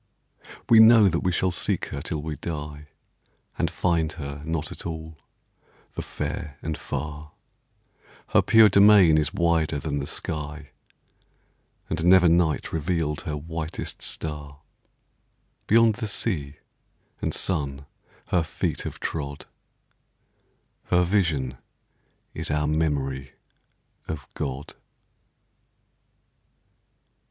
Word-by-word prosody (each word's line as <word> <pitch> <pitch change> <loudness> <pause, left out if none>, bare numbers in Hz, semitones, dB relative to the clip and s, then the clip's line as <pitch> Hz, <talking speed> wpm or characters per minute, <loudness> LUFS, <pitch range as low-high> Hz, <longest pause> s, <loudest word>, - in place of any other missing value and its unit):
We 115 - +7
know 110 -2 +8
that 85 -2 +1
we 90 - 0
shall 90 +2 +1
seek 85 - 0
her 70 - -5
till 75 +1 -3
we 80 -1 -4
die, 75 -1 -6 0.7
And - - 0
find 85 -3 0
her 70 -2 -7
not 80 -1 -3
at - - -7
all, 80 -2 -7 0.7
the - - -4
fair 75 -2 -5
and 80 0 -2
far: 75 +2 -6 1.0
Her - - +5
pure 110 -1 +7
domain 100 -6 +6
is 75 - 0
wider 85 -3 +1
than 70 0 -3
the 70 - -4
sky, 75 -2 -4 1.2
And 85 0 -2
never 90 0 +6
night 80 -3 +2
revealed 80 -2 -1
her 75 -1 -4
whitest 80 +1 -5
star; 75 -2 -5 1.1
Beyond 115 0 +5
the 110 +1 -4
sea 80 -9 -2 0.7
and - - -1
sun 70 -6 -2 0.4
her 90 - +3
feet 80 - -2
have - - -6
trod; 70 -2 -4 1.4
Her 90 0 +3
vision 80 -10 0 0.7
is - - -4
our 75 0 +1
memory 70 -4 -1 0.7
of 75 -3 -5
God. 70 +1 -5
80 Hz, 110 wpm, -25 LUFS, 75-85 Hz, 1.4 s, know